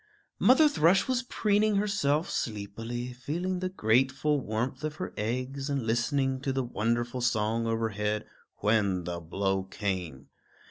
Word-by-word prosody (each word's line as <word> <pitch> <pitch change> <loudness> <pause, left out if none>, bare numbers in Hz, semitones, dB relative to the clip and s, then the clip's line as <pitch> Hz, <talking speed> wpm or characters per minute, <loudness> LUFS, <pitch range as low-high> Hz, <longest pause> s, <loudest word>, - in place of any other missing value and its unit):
Mother 285 +5 +6
Thrush 190 - +3
was 255 -1 +1
preening 215 -3 +1
herself 195 -7 +1
sleepily, 115 +3 -4
feeling 170 +9 -3
the 185 0 -2
grateful 135 - +2
warmth 120 +6 -3
of 155 0 -2
her - - -5
eggs 130 +6 -3
and 140 -4 -1
listening 130 +3 0
to 135 - -1
the 135 0 0
wonderful 120 +1 -1
song 115 -1 +1
overhead, 105 -2 -1 0.4
when 100 -4 +2
the 85 0 -4
blow 95 +3 -1
came. 95 -8 -4
120 Hz, 135 wpm, -29 LUFS, 105-150 Hz, 0.4 s, Mother